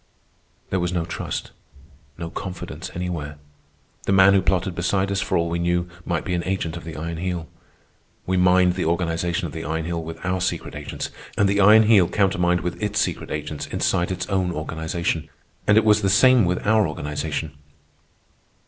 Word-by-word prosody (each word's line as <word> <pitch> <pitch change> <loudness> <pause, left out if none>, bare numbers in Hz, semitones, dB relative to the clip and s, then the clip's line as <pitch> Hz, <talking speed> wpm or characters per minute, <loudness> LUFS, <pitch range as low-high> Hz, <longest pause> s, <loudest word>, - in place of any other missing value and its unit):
There 95 - +1
was 90 0 -1
no 85 -2 -1
trust, 85 - -5 0.7
no 85 -1 -6
confidence 95 -1 -6
anywhere. 85 -5 -4 0.7
The - - +2
man 95 0 +7
who 100 - +4
plotted 95 0 0
beside 95 +3 0
us, 100 0 0
for - - 0
all 85 0 +1
we 85 +1 -2
knew, 85 0 0 0.2
might 85 -3 -2
be 90 - -2
an 85 -1 -1
agent 90 -4 -2
of 85 - -8
the 80 -2 -7
Iron 85 +1 -4
Heel. 85 -1 -3 0.8
We 95 - 0
mined 90 0 +4
the - - -2
organization 85 +1 0
of 75 - -6
the 80 - -5
Iron 80 0 -2
Heel 85 0 -2
with 80 0 -7
our 95 0 0
secret 90 - -2
agents, - - -5 0.3
and 100 - +4
the 100 +1 +1
Iron 110 +3 +8
Heel 105 -5 +5
countermined 90 -3 +2
with 90 +3 -4
its 105 -1 0
secret - - -1
agents 75 -1 -4
inside 85 - 0
its 95 - -3
own 95 -2 0
organization. 80 0 -3 0.4
And 105 - +5
it 110 - +5
was 105 -1 +5
the 100 - +2
same 125 +2 +6
with 90 +1 -1
our 110 -1 +4
organization. 75 0 -4
90 Hz, 185 wpm, -23 LUFS, 85-95 Hz, 0.8 s, Iron